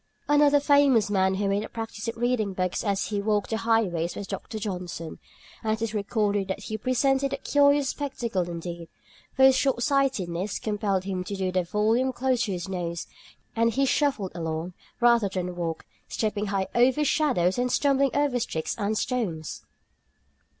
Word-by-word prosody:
Another 290 Hz, 0 st, +5 dB
famous 280 Hz, -7 st, +4 dB
man 190 Hz, -1 st, +2 dB
who 200 Hz, +1 st, -1 dB
made 200 Hz, +1 st, 0 dB
a -, -, -7 dB
practice 225 Hz, -1 st, -6 dB
of 230 Hz, -, -3 dB
reading 235 Hz, -4 st, 0 dB
books 185 Hz, -1 st, -1 dB
as 200 Hz, -3 st, -1 dB
he 205 Hz, -2 st, -1 dB
walked 210 Hz, 0 st, 0 dB
the 220 Hz, -, +1 dB
highways 215 Hz, -7 st, 0 dB
was 205 Hz, -, -5 dB
Dr. 220 Hz, -, -6 dB
Johnson, 180 Hz, -6 st, -5 dB, 0.4 s
and 215 Hz, -1 st, +1 dB
it 220 Hz, -, -3 dB
is 225 Hz, -1 st, -2 dB
recorded 205 Hz, -1 st, 0 dB
that 190 Hz, +1 st, -4 dB
he 215 Hz, +1 st, -4 dB
presented 270 Hz, +3 st, +1 dB
a -, -, -1 dB
curious 285 Hz, -1 st, +3 dB
spectacle 235 Hz, -10 st, -2 dB
indeed, 170 Hz, -1 st, -6 dB, 0.5 s
for 265 Hz, -, +3 dB
his 265 Hz, 0 st, +7 dB
shortsightedness 245 Hz, -, 0 dB
compelled 205 Hz, -3 st, -1 dB
him 185 Hz, -1 st, -3 dB
to 200 Hz, -, -4 dB
hold 185 Hz, -1 st, -1 dB
the 185 Hz, -1 st, +2 dB
volume 220 Hz, +8 st, +1 dB
close 255 Hz, -1 st, 0 dB
to 205 Hz, -, -3 dB
his 180 Hz, 0 st, -4 dB
nose, 170 Hz, -3 st, -4 dB, 0.5 s
and 230 Hz, 0 st, +2 dB
he 275 Hz, +4 st, +2 dB
shuffled 270 Hz, -9 st, +1 dB
along, 165 Hz, +1 st, -4 dB, 0.3 s
rather 235 Hz, -4 st, +4 dB
than 180 Hz, -1 st, -3 dB
walked, 165 Hz, -2 st, -4 dB, 0.2 s
stepping 210 Hz, -1 st, -2 dB
high 195 Hz, -1 st, 0 dB
over 260 Hz, +5 st, +3 dB
shadows 250 Hz, -, +2 dB
and 250 Hz, 0 st, 0 dB
stumbling 275 Hz, 0 st, +3 dB
over 285 Hz, -3 st, +1 dB
sticks 160 Hz, -8 st, -2 dB
and 210 Hz, +1 st, 0 dB
stones. 195 Hz, -, -2 dB
215 Hz, 170 wpm, -26 LUFS, 185-250 Hz, 0.5 s, his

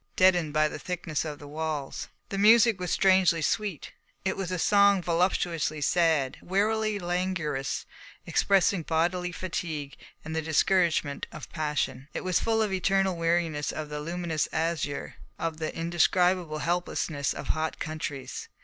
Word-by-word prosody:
Deadened 180 Hz, -6 st, +4 dB
by 155 Hz, +1 st, +3 dB
the -, -, -6 dB
thickness 175 Hz, -4 st, -3 dB
of 150 Hz, -2 st, -5 dB
the 145 Hz, -, -11 dB
walls, 150 Hz, -2 st, -4 dB, 0.2 s
the 200 Hz, -, -3 dB
music 225 Hz, 0 st, +6 dB
was 180 Hz, -1 st, -3 dB
strangely 185 Hz, -3 st, +4 dB
sweet. 195 Hz, 0 st, -2 dB, 0.3 s
It 190 Hz, -, 0 dB
was 190 Hz, -3 st, -3 dB
a 185 Hz, -, -1 dB
song 200 Hz, +1 st, +4 dB
voluptuously 170 Hz, -2 st, 0 dB
sad, 155 Hz, -3 st, +2 dB
wearily 215 Hz, +3 st, +1 dB
languorous, 175 Hz, -6 st, -2 dB, 0.4 s
expressing 195 Hz, -1 st, +3 dB
bodily 175 Hz, +3 st, 0 dB
fatigue 160 Hz, -5 st, -4 dB, 0.3 s
and 160 Hz, 0 st, -5 dB
the 160 Hz, -, 0 dB
discouragement 160 Hz, -2 st, +1 dB
of 155 Hz, -, -9 dB
passion. 150 Hz, -4 st, -2 dB
It -, -, -3 dB
was 185 Hz, -2 st, +2 dB
full 225 Hz, -1 st, +1 dB
of 210 Hz, -, -2 dB
the 190 Hz, -, +1 dB
eternal 195 Hz, 0 st, +2 dB
weariness 165 Hz, -3 st, 0 dB
of 155 Hz, -1 st, -5 dB
the 150 Hz, 0 st, -4 dB
luminous 165 Hz, -1 st, -2 dB
azure, 160 Hz, -3 st, -2 dB, 0.2 s
of 165 Hz, -1 st, -3 dB
the 155 Hz, 0 st, -3 dB
indescribable 175 Hz, 0 st, +2 dB
helplessness 165 Hz, -3 st, -1 dB
of -, -, -6 dB
hot 160 Hz, 0 st, -1 dB
countries. 155 Hz, -4 st, -5 dB
170 Hz, 150 wpm, -28 LUFS, 155-185 Hz, 0.4 s, music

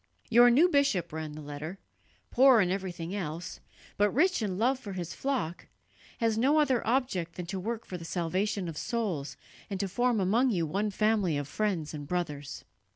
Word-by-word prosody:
"Your 240 Hz, +1 st, +8 dB
new 285 Hz, +9 st, +6 dB
bishop," 275 Hz, -, +1 dB
ran 155 Hz, -1 st, -5 dB
the 155 Hz, 0 st, -8 dB
letter, 150 Hz, +5 st, -6 dB, 0.5 s
"poor 260 Hz, -1 st, +6 dB
in 180 Hz, -3 st, +2 dB
everything 185 Hz, -2 st, -4 dB
else, 170 Hz, -4 st, -5 dB, 0.4 s
but 205 Hz, 0 st, +4 dB
rich 355 Hz, -, +2 dB
in 195 Hz, -4 st, -2 dB
love 255 Hz, +5 st, +2 dB
for 200 Hz, -6 st, -7 dB
his 175 Hz, -3 st, -5 dB
flock, 255 Hz, -12 st, -3 dB, 0.5 s
has 225 Hz, -1 st, +1 dB
no 285 Hz, +6 st, +4 dB
other 265 Hz, -5 st, +2 dB
object 225 Hz, -9 st, 0 dB
than 180 Hz, -, -5 dB
to 190 Hz, +2 st, -4 dB
work 225 Hz, +4 st, -4 dB
for 180 Hz, -, -6 dB
the -, -, -9 dB
salvation 185 Hz, +3 st, -1 dB
of 160 Hz, -3 st, -5 dB
souls 195 Hz, -12 st, -3 dB, 0.3 s
and 195 Hz, -2 st, -4 dB
to 200 Hz, -, 0 dB
form 240 Hz, +4 st, +1 dB
among 220 Hz, +8 st, +3 dB
you 175 Hz, -8 st, 0 dB
one 200 Hz, +7 st, -1 dB
family 205 Hz, -5 st, +1 dB
of 145 Hz, -1 st, -3 dB
friends 175 Hz, -3 st, -2 dB
and 145 Hz, -2 st, -7 dB
brothers." 150 Hz, -5 st, -4 dB
195 Hz, 185 wpm, -29 LUFS, 170-235 Hz, 0.5 s, Your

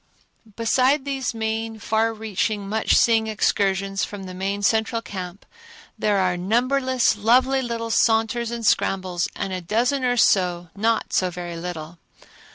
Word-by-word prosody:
Besides 255 Hz, +5 st, +2 dB
these 270 Hz, -4 st, -3 dB
main, 225 Hz, 0 st, -3 dB
far 220 Hz, +1 st, 0 dB
reaching, 215 Hz, -1 st, -2 dB
much 220 Hz, +2 st, +1 dB
seeing 225 Hz, -1 st, +3 dB
excursions 195 Hz, -2 st, 0 dB
from 205 Hz, -2 st, -5 dB
the 185 Hz, -1 st, -8 dB
main 195 Hz, +2 st, -3 dB
central 220 Hz, +2 st, +1 dB
camp, 190 Hz, -3 st, -8 dB, 0.5 s
there 205 Hz, -1 st, +1 dB
are 185 Hz, -2 st, +1 dB
numberless, 250 Hz, +5 st, +1 dB
lovely 255 Hz, +5 st, +3 dB
little 230 Hz, -2 st, -4 dB
saunters 225 Hz, +1 st, +2 dB
and 235 Hz, -1 st, -5 dB
scrambles 185 Hz, -4 st, +1 dB
and 190 Hz, -, -4 dB
a 185 Hz, -, -3 dB
dozen 240 Hz, +9 st, 0 dB
or 245 Hz, -1 st, +1 dB
so 180 Hz, -5 st, +2 dB
not 225 Hz, +2 st, 0 dB
so 185 Hz, -, +2 dB
very 175 Hz, -1 st, -6 dB
little. 165 Hz, -1 st, -7 dB
220 Hz, 145 wpm, -23 LUFS, 190-230 Hz, 0.5 s, seeing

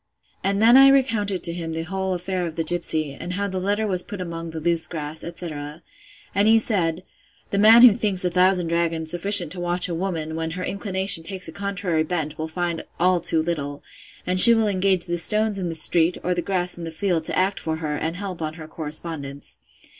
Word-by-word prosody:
And 200 Hz, +1 st, 0 dB
then 235 Hz, +4 st, +6 dB
I 270 Hz, 0 st, +8 dB
recounted 225 Hz, -8 st, +1 dB
to 170 Hz, -, +3 dB
him 165 Hz, -2 st, -5 dB
the 165 Hz, 0 st, -3 dB
whole 190 Hz, +2 st, -3 dB
affair 180 Hz, 0 st, -3 dB
of 160 Hz, -, -8 dB
the 165 Hz, -, -2 dB
gipsy, 160 Hz, -3 st, -1 dB
and 175 Hz, +5 st, -7 dB
how 200 Hz, +2 st, -2 dB
the 190 Hz, -1 st, -4 dB
letter 205 Hz, +3 st, -1 dB
was 185 Hz, -4 st, -1 dB
put 205 Hz, -, -9 dB
among 170 Hz, -2 st, -6 dB
the 160 Hz, 0 st, -6 dB
loose 170 Hz, +1 st, -1 dB
grass, 155 Hz, -1 st, -6 dB
etc. 155 Hz, -3 st, -7 dB, 0.5 s
And 200 Hz, +2 st, +2 dB
he 225 Hz, +1 st, +6 dB
said, 185 Hz, -6 st, -1 dB, 0.5 s
The 200 Hz, -, 0 dB
man 225 Hz, +3 st, +7 dB
who 245 Hz, -4 st, +9 dB
thinks 200 Hz, -5 st, -1 dB
a 180 Hz, -, 0 dB
thousand 180 Hz, 0 st, +3 dB
dragons 165 Hz, -1 st, +1 dB
sufficient 175 Hz, -1 st, +3 dB
to 180 Hz, -, -8 dB
watch 175 Hz, 0 st, -2 dB
a 175 Hz, -, -4 dB
woman, 165 Hz, -3 st, -3 dB
when 160 Hz, 0 st, -3 dB
her 180 Hz, -, -4 dB
inclination 190 Hz, -3 st, 0 dB
takes 185 Hz, 0 st, -4 dB
a -, -, -6 dB
contrary 195 Hz, -4 st, -2 dB
bent, 155 Hz, -2 st, -3 dB
will 160 Hz, -, -3 dB
find 170 Hz, 0 st, -3 dB, 0.2 s
all 180 Hz, 0 st, +2 dB
too 160 Hz, -1 st, +2 dB
little; 145 Hz, -4 st, -4 dB, 0.4 s
and 185 Hz, 0 st, 0 dB
she 235 Hz, +4 st, +11 dB
will 225 Hz, -1 st, +1 dB
engage 190 Hz, -2 st, +1 dB
the 175 Hz, -1 st, -2 dB
stones 215 Hz, +2 st, 0 dB
in 180 Hz, -2 st, -3 dB
the 165 Hz, -, -5 dB
street, 165 Hz, +2 st, +1 dB
or 180 Hz, -, 0 dB
the 175 Hz, -, -2 dB
grass 180 Hz, -2 st, -3 dB
in -, -, -7 dB
the 165 Hz, -, -5 dB
field, 165 Hz, -1 st, -1 dB
to -, -, 0 dB
act 190 Hz, +2 st, 0 dB
for 160 Hz, -1 st, -3 dB
her, 155 Hz, -2 st, -4 dB
and 160 Hz, +3 st, -3 dB
help 185 Hz, -2 st, -6 dB
on 155 Hz, 0 st, -4 dB
her 155 Hz, -2 st, -10 dB
correspondence. 150 Hz, -3 st, -5 dB
175 Hz, 220 wpm, -22 LUFS, 160-195 Hz, 0.5 s, she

